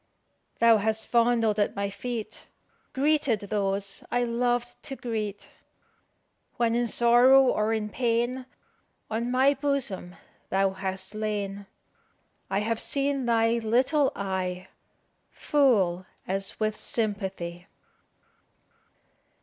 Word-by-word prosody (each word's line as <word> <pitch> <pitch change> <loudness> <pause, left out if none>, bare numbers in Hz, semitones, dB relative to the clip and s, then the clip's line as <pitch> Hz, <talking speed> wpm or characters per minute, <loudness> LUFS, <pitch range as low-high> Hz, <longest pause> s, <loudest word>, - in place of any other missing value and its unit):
Thou 230 -1 +6
hast 220 +1 -1
fondled 230 -3 +2
at 205 - +1
my 200 0 -2
feet, 225 +2 -6 0.4
Greeted 280 -5 +1
those 200 -1 -2
I 245 0 +1
lov'd 240 0 -1
to 270 - -6
greet; 215 -5 -4 1.1
When 235 -2 +2
in 240 0 +1
sorrow 245 +4 +6
or 220 -4 +1
in 220 -1 -1
pain, 240 +2 -1 0.6
On 230 +2 -1
my 260 +3 +4
bosom 270 -11 -2 0.3
thou 195 0 +2
hast 190 0 -4
lain. 205 -2 -3 0.8
I 195 - 0
have 225 +1 -1
seen 275 -2 0
thy 230 0 +2
little 260 +6 +2
eye 190 -1 -3 0.6
Full 200 -11 +1 0.2
as 195 +1 -1
if - - -12
with 215 -1 -1
sympathy." 190 -5 -3
225 Hz, 110 wpm, -27 LUFS, 200-245 Hz, 1.1 s, Thou